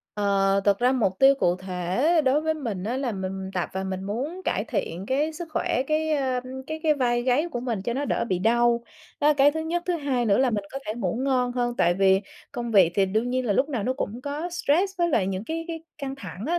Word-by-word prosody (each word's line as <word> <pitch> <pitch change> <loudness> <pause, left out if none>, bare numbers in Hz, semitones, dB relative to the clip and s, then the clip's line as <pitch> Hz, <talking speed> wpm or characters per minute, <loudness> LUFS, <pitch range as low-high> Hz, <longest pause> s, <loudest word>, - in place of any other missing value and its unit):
Ờ, 195 -1 +2
thực 200 -1 +3
ra 250 +2 +3
mục 220 -7 +1
tiêu 270 +1 +7
cụ 175 -9 +1
thể 185 +3 -3 0.2
đối 270 +3 +3
với 315 0 0
mình 220 -11 -4
á 240 +4 -2
là 260 -4 -1
mình 190 0 -4
tập 180 - -1
và 190 0 -3
mình 190 0 -4
muốn 280 - -4
cải - - 0
thiện 180 +4 -3
cái 295 +4 0
sức 335 +1 -7
khỏe, 255 - 0
cái, 310 +1 0
ờm, 260 -2 -1 0.2
cái 315 0 -5
cái 310 -2 +3
vai 240 -3 +1
gáy 260 +6 +2
của 240 -6 -3
mình 230 -6 -3
cho 235 - -2
nó 285 +2 -1
đỡ - - 0
bị 185 -2 0
đau, 235 +3 +3 0.4
đó 295 - +4
là 300 - +5
cái 280 +1 +5
thứ 320 - -3
nhất, 340 +2 -2
thứ 355 -2 +1
hai 270 -5 -1
nữa 205 0 +3
là 260 -1 +3
mình 205 -3 -2
có 270 - -3
thể 215 - -2
ngủ 225 -2 -2
ngon 250 -2 +1
hơn, 240 -1 -1
tại 175 +1 +3
vì 190 0 +4 0.3
công 240 -3 -4
việc 185 -5 +5
thì 195 -1 +3
đương 220 +6 0
nhiên 255 -1 -1
là 205 - +2
lúc 275 +8 +2
nào 240 -8 -2
nó 255 - 0
cũng 240 -3 -4
có 295 +5 -3
stress 355 +3 +1
với 345 0 +2
lại 215 - +2
những 195 +2 -3
cái 330 +3 -4
cái 325 -1 -5 0.2
căng 270 -2 -4
thẳng 190 -2 -8
á, 345 +2 +1
245 Hz, 260 wpm, -25 LUFS, 195-285 Hz, 0.4 s, tiêu